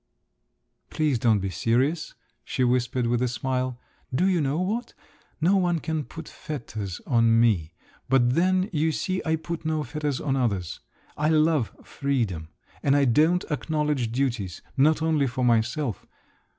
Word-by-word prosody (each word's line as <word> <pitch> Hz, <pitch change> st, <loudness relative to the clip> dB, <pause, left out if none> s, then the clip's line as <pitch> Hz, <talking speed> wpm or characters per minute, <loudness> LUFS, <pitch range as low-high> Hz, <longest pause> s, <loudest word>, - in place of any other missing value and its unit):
"Please 150 Hz, -6 st, 0 dB
don't 110 Hz, -2 st, +4 dB
be 95 Hz, -1 st, -3 dB
serious," 130 Hz, -, 0 dB, 0.3 s
she 130 Hz, -, -1 dB
whispered 125 Hz, 0 st, +1 dB
with 120 Hz, +1 st, +1 dB
a 125 Hz, -, +2 dB
smile. 125 Hz, 0 st, -2 dB, 0.3 s
"Do 130 Hz, +8 st, +1 dB
you 185 Hz, -3 st, +2 dB
know 145 Hz, +3 st, 0 dB
what, 220 Hz, +6 st, -2 dB, 0.4 s
no 180 Hz, +5 st, +3 dB
one 175 Hz, -2 st, +2 dB
can 155 Hz, -2 st, -2 dB
put 160 Hz, -1 st, -9 dB
fetters 110 Hz, -, -6 dB
on 115 Hz, -2 st, +4 dB
me, 90 Hz, -9 st, +2 dB, 0.3 s
but 125 Hz, -2 st, +4 dB
then 185 Hz, +4 st, +2 dB
you 160 Hz, +1 st, +2 dB
see 185 Hz, +4 st, -2 dB
I 160 Hz, -1 st, +1 dB
put 165 Hz, +1 st, -5 dB
no 155 Hz, -1 st, -1 dB
fetters 145 Hz, 0 st, -3 dB
on 135 Hz, -3 st, -1 dB
others. 100 Hz, -10 st, -1 dB, 0.4 s
I 150 Hz, +1 st, +1 dB
love 155 Hz, -5 st, +3 dB
freedom, 115 Hz, -, -2 dB, 0.3 s
and 140 Hz, 0 st, +3 dB
I 140 Hz, -1 st, +4 dB
don't 155 Hz, +9 st, +3 dB
acknowledge 150 Hz, -5 st, -1 dB
duties—not 135 Hz, -, 0 dB
only 155 Hz, -4 st, +2 dB
for 125 Hz, +1 st, -1 dB
myself. 120 Hz, +1 st, 0 dB
135 Hz, 150 wpm, -26 LUFS, 120-160 Hz, 0.4 s, don't